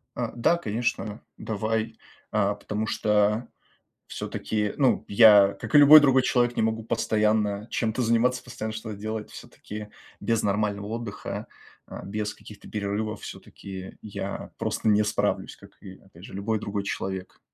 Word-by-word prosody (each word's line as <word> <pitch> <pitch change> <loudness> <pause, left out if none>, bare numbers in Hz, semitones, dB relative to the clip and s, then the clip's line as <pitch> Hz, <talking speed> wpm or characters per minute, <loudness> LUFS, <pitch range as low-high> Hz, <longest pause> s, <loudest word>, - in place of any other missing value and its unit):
А, - - -2
да, 120 +8 +3
конечно, 115 -4 -3 0.2
давай. 110 +1 -2 0.3
А, 105 -1 +1
потому 105 +1 -4
что 105 +2 +1 0.6
всё-таки, 105 -1 -3
ну, 135 -3 +3
я, 100 -2 +7
как - - -7
и - - +10
любой 150 +2 +11
другой 135 -2 +4
человек, 120 -1 +1
не - - +1
могу 110 0 0
постоянно 105 -2 0
чем-то 115 +2 -1
заниматься, 120 +2 +2
постоянно 110 -3 -5
что-то 110 -1 -6
делать. 110 +1 -5
Всё-таки 105 0 -9 0.3
без 115 -1 0
нормального 100 0 0
отдыха, 115 -2 -5 0.4
э, - - -8
без 105 +1 -3
каких-то 105 -2 -13
перерывов, 105 +1 -3
всё-таки 95 -1 -9
я 100 -2 -6
просто - - -2
не 105 0 +4
справлюсь, 105 - -1
как - - -16
и, 95 -1 -11
опять 95 -2 -18
же, - - -12
любой 105 +2 -1
другой 100 -1 -3
человек. 95 -1 -5
105 Hz, 145 wpm, -26 LUFS, 100-115 Hz, 0.6 s, любой